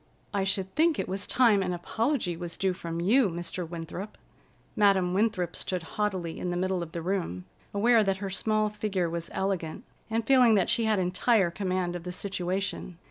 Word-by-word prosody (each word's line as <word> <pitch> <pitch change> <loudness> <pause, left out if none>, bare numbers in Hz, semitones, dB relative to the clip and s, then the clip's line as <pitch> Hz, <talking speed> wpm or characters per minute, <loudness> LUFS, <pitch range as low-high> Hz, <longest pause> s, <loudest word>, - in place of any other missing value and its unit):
"I 200 -1 +1
should 190 -1 -1
think 320 0 +3
it - - -2
was 195 +2 -4
time 230 -6 +4
an 180 -1 -1
apology 220 - -1
was 170 0 -5
due 190 -1 +1
from 170 -2 -5
you, 215 +6 +4
Mr. 175 0 -5
Winthrop." 170 +4 -6 0.6
Madam 195 -3 +3
Winthrop 190 -4 0
stood 185 -2 -3
haughtily 185 -2 -2
in 180 - -2
the 175 - -1
middle 185 0 0
of 165 -1 -6
the 170 -1 -5
room, 170 - -2 0.3
aware 225 +2 +4
that 195 -1 0
her 195 0 -4
small 215 +2 +1
figure 205 -4 -1
was 170 0 -4
elegant, 185 -5 -2 0.3
and 225 0 -1
feeling 250 -3 +6
that 190 -3 +2
she 230 - +2
had 215 -1 +2
entire 185 +1 +2
command 185 -1 -1
of 175 - -4
the 180 - -5
situation. 185 -1 -3
190 Hz, 190 wpm, -28 LUFS, 175-210 Hz, 0.6 s, feeling